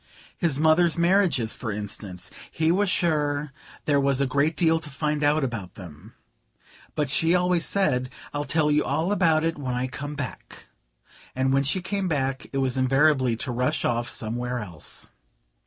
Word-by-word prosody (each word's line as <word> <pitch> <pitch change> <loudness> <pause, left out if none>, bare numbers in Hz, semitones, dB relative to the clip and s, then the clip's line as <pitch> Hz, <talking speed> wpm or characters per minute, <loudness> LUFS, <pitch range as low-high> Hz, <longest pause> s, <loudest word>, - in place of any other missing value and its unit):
His 155 -6 +1
mother's 160 +2 +4
marriages, 170 - +2
for 115 -4 -5
instance: 100 -3 -6 0.2
he 160 0 +1
was 200 +2 +2
sure 150 -5 0 0.3
there 145 -2 +3
was 140 -1 +2
a 140 - +2
great 140 +4 +1
deal 165 -1 +3
to 155 -2 -8
find 150 +1 -2
out 145 +1 +3
about 115 -8 -4
them. 90 +3 -12 0.8
But 150 - 0
she 165 +6 +2
always 180 -1 +2
said: 130 -11 +1 0.2
"I'll 145 0 -2
tell 150 +2 +2
you 150 0 +3
all 165 +5 0
about 165 -6 +3
it 165 -2 -1
when 130 -3 -2
I 125 +1 -1
come 145 +3 -6
back" 140 -5 -7 0.7
and 130 +1 +1
when 135 0 +3
she 175 +7 -2
came 195 0 -1
back 135 -5 -1
it 135 - -3
was 130 -1 0
invariably 130 -1 +3
to 120 +3 -3
rush 125 +1 0
off 120 0 0
somewhere 120 +3 -3
else. 90 -10 -5
145 Hz, 170 wpm, -25 LUFS, 125-160 Hz, 0.8 s, mother's